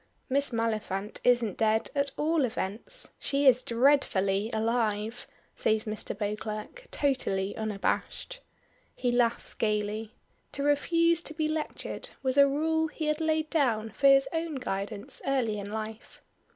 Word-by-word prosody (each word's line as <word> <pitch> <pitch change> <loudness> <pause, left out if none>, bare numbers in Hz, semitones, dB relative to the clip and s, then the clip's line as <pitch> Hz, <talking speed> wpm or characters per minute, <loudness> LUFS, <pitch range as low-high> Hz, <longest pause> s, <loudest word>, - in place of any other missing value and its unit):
"Miss 280 +2 +2
Maliphant 215 -3 -2
isn't 240 -5 +2
dead 220 0 +2
at 280 -1 +1
all 315 0 +2
events. 230 - -2
She 280 0 +1
is 255 -2 +6
dreadfully 230 -6 +2
alive," 220 0 -1 0.3
says 220 0 +1
Mr. 215 -2 -4
Beauclerk, 215 - -4
totally 205 -9 0
unabashed. 220 - -2 0.6
He 245 - 0
laughs 240 -1 +1
gaily. 215 0 -2 0.4
To 280 - -3
refuse 335 +4 +3
to 310 - -7
be 310 -1 0
lectured 310 0 -4
was 260 -1 +1
a 280 0 +8
rule 320 +3 +1
he 310 0 -5
had 305 +1 0
laid 315 -1 0
down 225 -9 +1
for 275 +6 +2
his 275 0 +6
own 325 -1 -2
guidance 205 -4 -3
early 240 -6 +1
in 200 0 -6
life. 220 +1 -6
240 Hz, 140 wpm, -29 LUFS, 215-290 Hz, 0.6 s, a